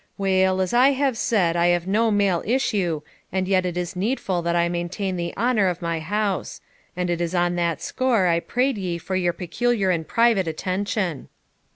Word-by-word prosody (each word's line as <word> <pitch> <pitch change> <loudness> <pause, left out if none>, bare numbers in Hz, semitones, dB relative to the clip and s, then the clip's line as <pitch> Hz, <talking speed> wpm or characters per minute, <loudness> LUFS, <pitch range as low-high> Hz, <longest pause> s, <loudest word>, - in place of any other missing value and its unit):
Weel, 190 -1 +2
as 185 +2 -1
I 260 +3 +5
have 270 -2 0
said, 190 -7 +1
I 170 0 +3
have 175 -1 +2
no 220 +4 +2
male 200 -4 +2
issue, 200 - 0 0.3
and 185 0 -1
yet 185 -1 +2
it 175 -1 -4
is 180 0 -3
needful 190 -3 -1
that 170 0 -1
I 170 0 +2
maintain 175 +3 -3
the 170 -1 -3
honour 225 -3 +2
of 180 -1 -1
my 170 -1 -2
house; 200 +3 -2 0.4
and 180 0 -1
it 175 0 -1
is 170 +1 -2
on 175 0 +2
that 170 -3 -1
score 250 -7 +1
I 170 -1 +3
prayed 250 +5 -1
ye 180 -3 -2
for 185 +3 -4
your 180 -2 +1
peculiar 195 +3 0
and 160 -3 -2
private 230 -6 +3
attention.' 185 - -2
185 Hz, 195 wpm, -23 LUFS, 175-210 Hz, 0.4 s, I